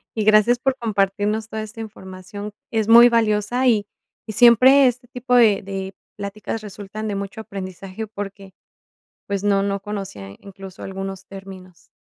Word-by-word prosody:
Y 220 Hz, -, 0 dB
gracias 215 Hz, +3 st, +5 dB
por 270 Hz, 0 st, 0 dB
compartirnos 210 Hz, 0 st, -1 dB
toda 220 Hz, 0 st, -4 dB
esta 220 Hz, +1 st, -9 dB
información. 205 Hz, -1 st, -9 dB, 0.2 s
Es 220 Hz, -2 st, 0 dB
muy 235 Hz, +1 st, +9 dB
valiosa, 230 Hz, +2 st, +1 dB
y 210 Hz, -4 st, +2 dB, 0.4 s
y 215 Hz, -, -5 dB
siempre 255 Hz, +5 st, +7 dB
este 245 Hz, 0 st, -3 dB
tipo 250 Hz, +1 st, -4 dB
de 220 Hz, -5 st, +5 dB
de 195 Hz, 0 st, -6 dB, 0.2 s
pláticas 210 Hz, +2 st, -5 dB
resultan 210 Hz, +1 st, -7 dB
de 205 Hz, -, -2 dB
mucho 200 Hz, +2 st, -5 dB
aprendizaje 195 Hz, +1 st, -7 dB
porque, 200 Hz, -2 st, -8 dB, 0.7 s
pues, 200 Hz, -1 st, -2 dB
no 200 Hz, -1 st, +3 dB
no 200 Hz, 0 st, -1 dB
conocía 195 Hz, -, -7 dB
incluso 195 Hz, -1 st, -11 dB
algunos 195 Hz, 0 st, -6 dB
términos. 190 Hz, -2 st, -12 dB
205 Hz, 150 wpm, -21 LUFS, 195-225 Hz, 0.7 s, muy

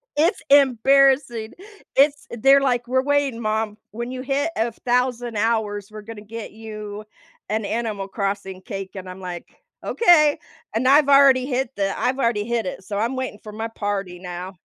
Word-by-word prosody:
It's 325 Hz, +7 st, +2 dB
embarrassing, 270 Hz, -3 st, +4 dB, 0.4 s
it's 285 Hz, +1 st, +3 dB
they're 270 Hz, +4 st, +5 dB
like, 245 Hz, -3 st, 0 dB
"We're 260 Hz, +1 st, +1 dB
waiting 285 Hz, -4 st, +1 dB
mom, 215 Hz, -1 st, -1 dB
when 235 Hz, +3 st, -5 dB
you 255 Hz, 0 st, -5 dB
hit 280 Hz, +4 st, -1 dB
1000 240 Hz, +1 st, -1 dB
hours, 205 Hz, -2 st, -1 dB
we're 215 Hz, 0 st, -8 dB
gonna 215 Hz, 0 st, -10 dB
get 220 Hz, +1 st, -8 dB
you 215 Hz, -1 st, -8 dB, 0.5 s
an 215 Hz, 0 st, -1 dB
animal 215 Hz, -3 st, -3 dB
crossing 195 Hz, -2 st, -4 dB
cake," 195 Hz, 0 st, -6 dB
and 185 Hz, -1 st, -7 dB
I'm 185 Hz, +1 st, -9 dB
like, 175 Hz, -2 st, -6 dB, 0.4 s
"Okay," 310 Hz, -9 st, +4 dB, 0.3 s
and 230 Hz, +4 st, 0 dB
I've 285 Hz, +1 st, +5 dB
already 275 Hz, -2 st, +6 dB
hit 260 Hz, -2 st, -1 dB
the 195 Hz, -1 st, -1 dB
I've 260 Hz, +1 st, 0 dB
already 230 Hz, -4 st, +1 dB
hit 235 Hz, -2 st, -1 dB
it, 185 Hz, -, -6 dB
so 200 Hz, +1 st, -5 dB
I'm 235 Hz, +5 st, -1 dB
waiting 260 Hz, -5 st, -4 dB
for 210 Hz, -, -8 dB
my 220 Hz, +2 st, -4 dB
party 200 Hz, -5 st, -4 dB
now. 180 Hz, +1 st, -7 dB
230 Hz, 165 wpm, -22 LUFS, 205-265 Hz, 0.5 s, already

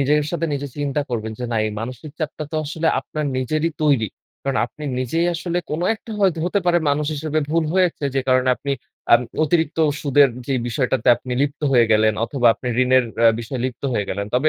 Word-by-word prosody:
নিজের 150 Hz, +2 st, +2 dB
সাথে 170 Hz, -1 st, -1 dB
নিজে 140 Hz, 0 st, -4 dB
চিন্তা 145 Hz, 0 st, -1 dB
করবেন 110 Hz, -2 st, -3 dB
যে 125 Hz, -, -4 dB
না -, -, 0 dB
এই 105 Hz, -, -3 dB
মানসিক 130 Hz, +6 st, -7 dB
চাপটা 155 Hz, -1 st, -4 dB
তো -, -, -1 dB
আসলে 160 Hz, +2 st, -2 dB
আপনার 155 Hz, -1 st, -4 dB
নিজেরই 155 Hz, +6 st, 0 dB
তৈরি। 135 Hz, -8 st, +3 dB, 0.3 s
কারণ 135 Hz, -1 st, -1 dB
আপনি 150 Hz, +4 st, -11 dB, 0.2 s
নিজেই 165 Hz, +7 st, 0 dB
আসলে 175 Hz, +1 st, -2 dB
কোনো 165 Hz, +4 st, -1 dB
একটা 220 Hz, 0 st, -10 dB
হয়তো 185 Hz, -4 st, +3 dB
হতে 200 Hz, +2 st, +1 dB
পারে 175 Hz, 0 st, +4 dB
মানুষ 145 Hz, +1 st, 0 dB
হিসেবে 155 Hz, +1 st, -2 dB
ভুল 165 Hz, 0 st, +2 dB
হয়েছে 180 Hz, -5 st, +1 dB
যে -, -, +3 dB
কারণে 130 Hz, 0 st, +3 dB
আপনি 140 Hz, 0 st, -3 dB, 0.4 s
আ -, -, +11 dB, 0.3 s
অতিরিক্ত 160 Hz, 0 st, 0 dB, 0.2 s
সুদের 140 Hz, -1 st, +5 dB, 0.2 s
যেই 130 Hz, -3 st, 0 dB
বিষয়টাতে 125 Hz, 0 st, 0 dB
আপনি 125 Hz, -, -7 dB
লিপ্ত 145 Hz, +1 st, -2 dB
হয়ে 120 Hz, -2 st, +5 dB
গেলেন 110 Hz, 0 st, +4 dB
অথবা 125 Hz, -2 st, 0 dB
আপনি 125 Hz, -, -10 dB, 0.2 s
ঋণের 130 Hz, 0 st, +4 dB
অ্যা 115 Hz, -1 st, +6 dB
বিষয়ে 120 Hz, +2 st, -4 dB
লিপ্ত 130 Hz, 0 st, -4 dB
হয়ে 105 Hz, -3 st, -1 dB
গেলেন। 100 Hz, +1 st, -3 dB
তবে 145 Hz, +5 st, +3 dB
140 Hz, 205 wpm, -21 LUFS, 125-155 Hz, 0.4 s, আ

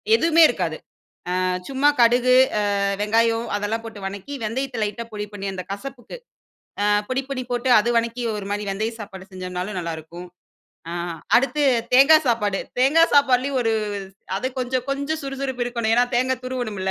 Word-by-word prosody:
எதுவுமே 330 Hz, -5 st, +4 dB
இருக்காது. -, -, -2 dB, 0.6 s
ஆ -, -, 0 dB, 0.3 s
சும்மா 275 Hz, +2 st, +3 dB
கடுகு, 245 Hz, +2 st, +4 dB, 0.2 s
ஆ -, -, +1 dB, 0.4 s
வெங்காயம் 230 Hz, +2 st, +2 dB
அதெல்லாம் 215 Hz, +2 st, -3 dB
போட்டு 225 Hz, -2 st, -9 dB
வணக்கி 200 Hz, +8 st, -7 dB
வெந்தயத்த 245 Hz, +1 st, -3 dB
லைட்டா 210 Hz, +3 st, -4 dB
பொடி 210 Hz, 0 st, -4 dB
பண்ணி 200 Hz, -1 st, -5 dB
அந்த 185 Hz, -1 st, -5 dB
கசப்புக்கு. 250 Hz, -, -7 dB, 0.6 s
ஆ -, -, +1 dB, 0.2 s
பொடி, 260 Hz, +1 st, -1 dB
பொடி 265 Hz, -2 st, -3 dB
போட்டு 245 Hz, +1 st, -1 dB
அது 220 Hz, +3 st, 0 dB
வணக்கி 235 Hz, +1 st, -4 dB
ஒரு 205 Hz, -2 st, -5 dB
மாரி 205 Hz, +1 st, -2 dB
வெந்தயம் 220 Hz, +4 st, -3 dB
சாப்பாடு 190 Hz, -1 st, -10 dB
செஞ்சோம்னாலும் 185 Hz, +1 st, -5 dB
நல்லாருக்கும். 170 Hz, +1 st, -7 dB, 0.6 s
ஆ -, -, -5 dB, 0.4 s
அடுத்து 275 Hz, +4 st, +1 dB, 0.3 s
தேங்கா 275 Hz, +5 st, +8 dB
சாப்பாடு. 210 Hz, -5 st, +1 dB, 0.2 s
தேங்கா 285 Hz, +6 st, +5 dB
சாப்பாட்லயும் 270 Hz, -1 st, +3 dB
ஒரு 225 Hz, -1 st, +1 dB, 0.6 s
அது 205 Hz, -, -2 dB
கொஞ்சம், 255 Hz, 0 st, -1 dB
கொஞ்சம் 280 Hz, +3 st, -2 dB
சுறுசுறுப்பு 270 Hz, -2 st, -4 dB
இருக்கணும் 235 Hz, -2 st, -1 dB
ஏன்னா, 245 Hz, +1 st, +4 dB
தேங்காய் 255 Hz, +1 st, 0 dB
துருவணுமில்ல. 220 Hz, -7 st, -3 dB
235 Hz, 155 wpm, -22 LUFS, 205-260 Hz, 0.6 s, தேங்கா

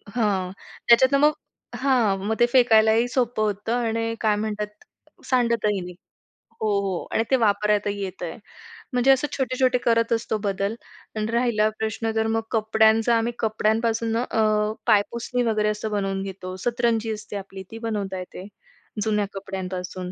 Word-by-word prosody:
हां, 195 Hz, -5 st, 0 dB, 0.4 s
त्याच्यातनं 260 Hz, +4 st, +6 dB
मग 305 Hz, -, +2 dB, 0.5 s
हां, 245 Hz, -7 st, +2 dB
मग 220 Hz, -, 0 dB
ते 240 Hz, -, +6 dB
फेकायलाही 225 Hz, -1 st, +5 dB
सोपं 245 Hz, -3 st, -1 dB
होतं 210 Hz, +2 st, -1 dB
आणि 230 Hz, -1 st, -1 dB
काय 215 Hz, -2 st, +3 dB
म्हणतात, 210 Hz, 0 st, -3 dB, 0.6 s
सांडतही 235 Hz, -5 st, +1 dB
नाही. 180 Hz, 0 st, -8 dB, 0.7 s
हो, 220 Hz, -, +1 dB
हो 190 Hz, -3 st, -2 dB
आणि 225 Hz, -, +1 dB
ते -, -, +6 dB
वापरायलाही 205 Hz, -2 st, +1 dB
येतंय. 180 Hz, -2 st, -6 dB, 0.6 s
म्हणजे 250 Hz, +2 st, +4 dB
असं 270 Hz, +2 st, +3 dB
छोटे-छोटे 255 Hz, -1 st, +1 dB
करत 230 Hz, -1 st, +2 dB
असतो 225 Hz, -1 st, -1 dB
बदल 200 Hz, +2 st, -1 dB, 0.4 s
आणि 215 Hz, -, -1 dB
राहिला 235 Hz, -3 st, +2 dB
प्रश्न 220 Hz, +1 st, -2 dB
तर 220 Hz, 0 st, +1 dB
मग 225 Hz, 0 st, 0 dB
कपड्यांचा, 220 Hz, +1 st, +3 dB
आम्ही 235 Hz, +1 st, -1 dB
कपड्यांपासून 225 Hz, +1 st, 0 dB
अ, 215 Hz, -3 st, +1 dB
पायपुसणी 235 Hz, +3 st, +1 dB
वगैरे 215 Hz, -2 st, +1 dB
असं 215 Hz, +1 st, -3 dB
बनवून 195 Hz, -1 st, -1 dB
घेतो. 185 Hz, -1 st, -7 dB
सतरंजी 230 Hz, -2 st, 0 dB
असते 210 Hz, -1 st, -7 dB
आपली 195 Hz, 0 st, -8 dB
ती 225 Hz, -, -7 dB
बनवता 195 Hz, -4 st, -3 dB
येते. 180 Hz, +1 st, -9 dB, 0.6 s
जुन्या 210 Hz, -1 st, +1 dB
कपड्यांपासून. 185 Hz, -1 st, -5 dB
220 Hz, 145 wpm, -24 LUFS, 205-235 Hz, 0.7 s, त्याच्यातनं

